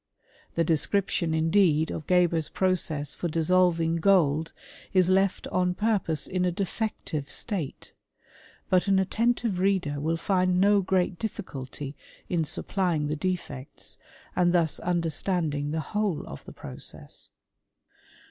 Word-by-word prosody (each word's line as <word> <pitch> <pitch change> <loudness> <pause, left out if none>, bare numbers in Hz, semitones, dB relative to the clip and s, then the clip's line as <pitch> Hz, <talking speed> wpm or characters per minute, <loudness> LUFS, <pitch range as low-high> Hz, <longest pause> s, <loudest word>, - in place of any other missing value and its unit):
The 165 - +3
description, 165 +1 +1
indeed, 160 -1 +3
of 155 - -6
Geber's 170 -4 +3
process 165 -6 0
for 175 - -3
dissolving 165 0 +2
gold 165 -4 +3 0.4
is 185 -2 +4
left 190 0 +2
on 180 0 +1
purpose 195 -8 0
in 185 -1 -1
a 180 - +2
defective 180 -6 -3
state; 185 - -3 0.7
but 185 +1 +2
an 195 -1 +4
attentive 225 +1 +1
reader 185 -7 +1
will 160 +3 0
find 185 0 +2
no 200 +1 +5
great 180 -2 0
difficulty 145 - -5 0.3
in 165 -3 +1
supplying 165 -2 0
the 150 - 0
defects, 150 -6 -4 0.4
and 175 -1 +3
thus 165 -3 +2
understanding 165 -3 -1
the 160 +1 -1
whole 210 -6 0
of 70 - -9
the - - -9
process. 70 -2 -5
175 Hz, 125 wpm, -27 LUFS, 155-190 Hz, 0.7 s, no